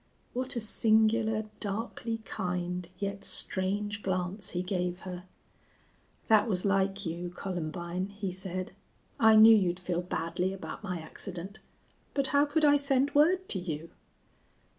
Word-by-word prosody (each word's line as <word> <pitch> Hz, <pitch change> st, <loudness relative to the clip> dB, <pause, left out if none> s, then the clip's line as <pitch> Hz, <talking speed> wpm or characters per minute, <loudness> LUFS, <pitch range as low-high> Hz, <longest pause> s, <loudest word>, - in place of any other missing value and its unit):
What 255 Hz, +1 st, -1 dB
a 235 Hz, -, -1 dB
singular, 220 Hz, 0 st, +3 dB
darkly 225 Hz, +2 st, -3 dB
kind, 180 Hz, -2 st, -3 dB
yet 200 Hz, +1 st, -4 dB
strange 205 Hz, +2 st, -1 dB
glance 185 Hz, +1 st, -2 dB
he 180 Hz, 0 st, -1 dB
gave 180 Hz, -1 st, -2 dB
her! 180 Hz, -1 st, -7 dB, 1.0 s
"That 215 Hz, -1 st, +5 dB
was 185 Hz, -2 st, 0 dB
like 195 Hz, 0 st, +1 dB
you, 170 Hz, +2 st, -4 dB
Columbine," 175 Hz, 0 st, -4 dB
he 200 Hz, -1 st, -5 dB
said. 185 Hz, 0 st, -5 dB, 0.5 s
"I 220 Hz, -1 st, +7 dB
knew 220 Hz, +1 st, +9 dB
you'd 180 Hz, -4 st, +1 dB
feel 175 Hz, -1 st, -2 dB
badly 180 Hz, +1 st, -2 dB
about 195 Hz, +2 st, -7 dB
my 180 Hz, -4 st, -3 dB
accident. 185 Hz, +4 st, -6 dB, 0.6 s
But 275 Hz, -1 st, +2 dB
how 285 Hz, +1 st, +5 dB
could 305 Hz, +1 st, +2 dB
I 290 Hz, 0 st, +6 dB
send 280 Hz, 0 st, +2 dB
word 360 Hz, +6 st, +4 dB
to 190 Hz, -, +2 dB
you?" 165 Hz, -2 st, -5 dB
195 Hz, 140 wpm, -30 LUFS, 180-220 Hz, 1.0 s, knew